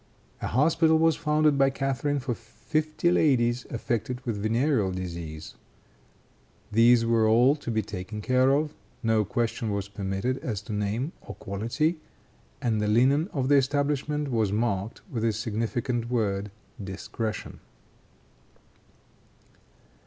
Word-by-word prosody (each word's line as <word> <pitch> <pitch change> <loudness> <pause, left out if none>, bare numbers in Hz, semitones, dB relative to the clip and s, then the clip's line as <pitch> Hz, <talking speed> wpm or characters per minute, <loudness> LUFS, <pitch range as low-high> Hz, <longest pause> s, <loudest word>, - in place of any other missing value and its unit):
A - - -2
hospital 160 +5 +3
was 165 -1 +3
founded 150 -2 +2
by 135 0 +5
Catharine 135 +1 -1
for 130 -1 -2
fifty 135 +10 -1
ladies 120 -7 +2
affected 120 +1 -2
with 110 -4 -2
venereal 115 -1 +1
disease. 85 -4 -6 1.2
These 115 +2 +5
were 115 -1 +3
all 120 +6 +5
to 145 - -7
be 110 -2 0
taken 105 +2 -6
care 130 +4 +3
of; 150 +2 +1 0.3
no 110 -1 +3
question 115 +1 -2
was 100 -1 -2
permitted 100 +6 -2
as 105 -5 -4
to 105 - -6
name 105 +8 -1
or - - -9
quality, 115 - -1 0.7
and 110 -3 +1
the 105 - 0
linen 135 - +3
of 135 -3 -1
the 145 +1 +5
establishment 145 +1 0
was 110 -4 +1
marked 105 -1 -1
with 125 - -4
the 115 0 +2
significant 115 +2 -2
word 105 -4 0 0.3
"discretion." 100 +3 -5
120 Hz, 130 wpm, -27 LUFS, 105-140 Hz, 1.2 s, by